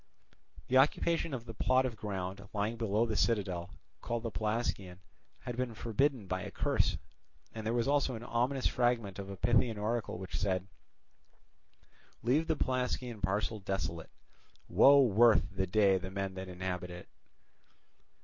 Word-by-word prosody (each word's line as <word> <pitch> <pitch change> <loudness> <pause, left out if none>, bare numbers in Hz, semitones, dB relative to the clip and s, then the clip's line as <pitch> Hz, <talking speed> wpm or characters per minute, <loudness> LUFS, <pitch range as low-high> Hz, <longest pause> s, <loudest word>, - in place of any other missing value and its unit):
The 130 - +3
occupation 165 +4 +2
of 125 -3 -5
the 115 - -7
plot 130 +4 +2
of 125 -3 -3
ground 100 -1 -5
lying 105 +2 -1
below 110 -1 +1
the 110 -2 -2
citadel 95 -7 0 0.3
called 120 0 -3
the 115 - -3
Pelasgian 105 -5 -2 0.4
had 125 - -5
been 125 -2 -3
forbidden 120 +2 0
by 95 0 -2
a - - -5
curse; - - 0 0.6
and 110 - -6
there 115 - 0
was 120 +1 +1
also 140 -3 +2
an 115 - -7
ominous 125 +3 -1
fragment 120 -6 +1
of 100 0 -6
a 100 - -7
Pythian 120 +3 +2
oracle 110 0 -2
which 95 +1 -5
said: 95 -2 0 1.6
Leave 140 +8 +2
the 160 - +1
Pelasgian 125 -3 -2
parcel 105 +3 -1
desolate, 95 -4 -4 0.6
Woe 140 0 +7
worth 110 -3 +4
the 95 0 0
day 95 -1 +4
that 95 +1 -6
men 95 -1 -3
inhabit 90 -1 -4
it! 90 0 -9
110 Hz, 150 wpm, -32 LUFS, 95-120 Hz, 1.6 s, Woe